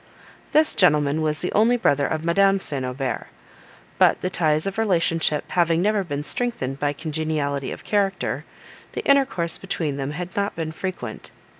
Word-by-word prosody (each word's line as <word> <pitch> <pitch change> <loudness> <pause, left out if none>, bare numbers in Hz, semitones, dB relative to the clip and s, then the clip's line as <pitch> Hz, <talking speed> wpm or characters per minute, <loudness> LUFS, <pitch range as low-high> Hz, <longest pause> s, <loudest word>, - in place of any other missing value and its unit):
This 310 +1 +4
gentleman 150 -5 +3
was 155 0 -1
the 180 - -2
only 230 +4 +4
brother 140 - +2
of 160 0 -3
Madame 195 +3 +4
St. 140 -7 -4
Aubert; 125 -1 -3 0.7
but - - +5
the 185 - -2
ties 155 -2 +1
of 195 +2 -3
relationship 165 -7 +1
having 170 -2 +2
never 210 -1 +2
been 145 -4 -4
strengthened 145 - -2
by 145 0 +1
congeniality 150 -2 -2
of - - -8
character, 195 -2 0 0.5
the - - -4
intercourse 265 -12 +2
between 160 -7 -3
them 135 0 -3
had 180 +3 -6
not 200 0 -1
been 160 -1 -3
frequent. 185 +3 -6
165 Hz, 160 wpm, -23 LUFS, 145-195 Hz, 0.7 s, but